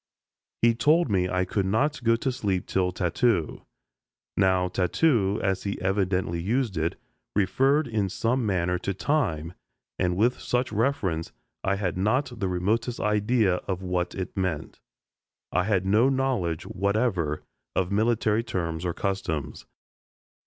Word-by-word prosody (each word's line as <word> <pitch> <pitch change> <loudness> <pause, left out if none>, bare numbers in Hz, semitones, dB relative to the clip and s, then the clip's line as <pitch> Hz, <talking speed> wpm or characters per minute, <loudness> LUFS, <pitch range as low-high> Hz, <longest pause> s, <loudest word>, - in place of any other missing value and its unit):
He 115 0 +6
told 150 +4 +3
me 90 -2 +2
I 90 0 +1
could 95 +1 -1
not 135 +7 0
go 115 0 +4
to 130 +3 -1
sleep 100 -7 -1
till 90 -1 0
"tattoo." 90 0 0 0.7
Now 95 -1 +3
tattoo, 100 - +2
as 95 -1 0
he 100 0 -3
evidently 95 -2 0
used 115 +2 0
it, 80 +1 -1 0.4
referred 135 +9 +2
in 105 -4 0
some 120 +6 0
manner 90 -3 0
to 100 +1 -3
time, 85 - 0 0.5
and 90 -1 +1
with 120 +5 +2
such 125 0 -1
reference 105 -8 0 0.3
I 95 - +1
had 95 -3 -2
not 120 +4 0
the 95 - 0
remotest 110 +7 0
idea 105 -2 +2
of 95 -1 -3
what 90 -1 -1
it 95 -2 -5
meant. 95 -5 -3 0.7
I 90 0 +1
had 95 -3 +1
no 110 +7 +4
knowledge 130 -12 0
whatever 100 -6 0 0.3
of 95 0 0
military 110 +1 +2
terms 85 -6 -3
or 85 - -1
customs. 90 -7 -3
100 Hz, 140 wpm, -26 LUFS, 90-115 Hz, 0.7 s, He